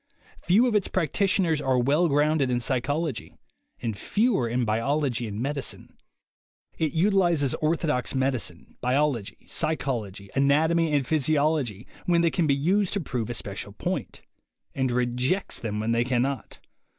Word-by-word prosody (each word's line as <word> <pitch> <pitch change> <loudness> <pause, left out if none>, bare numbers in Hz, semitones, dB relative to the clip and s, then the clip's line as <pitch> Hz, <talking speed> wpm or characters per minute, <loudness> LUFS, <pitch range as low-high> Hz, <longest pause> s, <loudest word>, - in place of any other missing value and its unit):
Few 200 +9 +4
of 245 - +1
its 210 -3 +2
practitioners 180 -1 +1
are 130 -1 +1
well 145 +8 +3
grounded 145 -1 +2
in 125 -1 +1
psychology, 135 +1 -2 0.5
and 115 -3 -2
fewer 200 - +1
in 120 +1 0
biology 120 +2 0
and 105 0 -5
medicine. 140 +1 -3 0.8
It 155 -3 0
utilizes 175 -6 +2
orthodox 155 -5 0
medicine, 130 -10 -2
biology, 125 -4 0
psychology, 110 -11 -2
anatomy 155 +4 +3
and 145 -3 +1
physiology 145 -6 +1 0.2
when 170 -1 +4
they 170 -1 +2
can 170 -4 +1
be 140 - +3
used 185 +7 +1
to 200 - 0
prove 125 - -3
a - - -2
special - - -4
point, - - -4 0.5
and 130 -1 0
rejects 125 +9 0
them 105 -2 -3
when 110 +2 -1
they 115 0 +2
can 125 -1 +1
not. 135 -4 -4
140 Hz, 145 wpm, -26 LUFS, 120-160 Hz, 0.8 s, Few